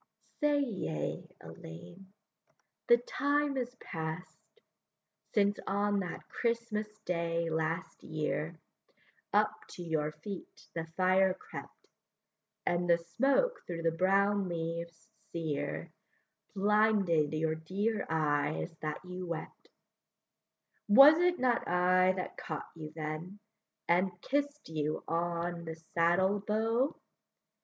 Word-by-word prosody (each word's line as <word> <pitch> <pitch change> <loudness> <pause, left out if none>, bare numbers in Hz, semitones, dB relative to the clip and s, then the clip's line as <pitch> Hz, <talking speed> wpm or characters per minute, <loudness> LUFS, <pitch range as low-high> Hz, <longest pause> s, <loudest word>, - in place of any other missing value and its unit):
Say, 295 -1 +3
yea, 130 - -3
Ellayne; 175 - -11 0.8
the 475 - +8
time 290 - 0
is 250 -1 -3
past, 165 - -7 0.8
Since 205 -1 +3
on 205 +1 +1
that 180 -2 -5
Christmas 230 -2 -1 0.2
day 170 -1 0
last 160 +1 -2
year 155 +1 -2 0.7
Up 210 +1 +4 0.2
to 175 - -6
your 155 -3 0
feet 185 +6 -8
the 165 -1 -3
fire 185 0 +4
crept, - - -10 0.8
And 175 0 +1
the 170 - +6
smoke 270 - +1
through 165 -1 -4
the 165 - +3
brown 195 +3 +2
leaves 170 0 -4 0.2
sere 160 -4 -3 0.6
Blinded 200 -6 +3
your 155 0 +1
dear 195 +7 -1
eyes 155 +1 0
that 155 +3 -4
you 180 0 -6
wept; 165 -2 -6 1.2
Was 275 +9 +9
it 355 0 +3
not 250 -2 +1
I 185 +1 +4
that 185 -1 -5
caught 155 -2 -5
you 155 -2 -8
then, 160 +5 -5 0.5
And 180 +1 +2
kiss'd 285 +6 -1
you 155 -1 -2
on 170 0 -1
the 160 -1 -5
saddle 175 +4 +2
bow? 225 +6 +1
180 Hz, 110 wpm, -32 LUFS, 165-210 Hz, 1.2 s, Was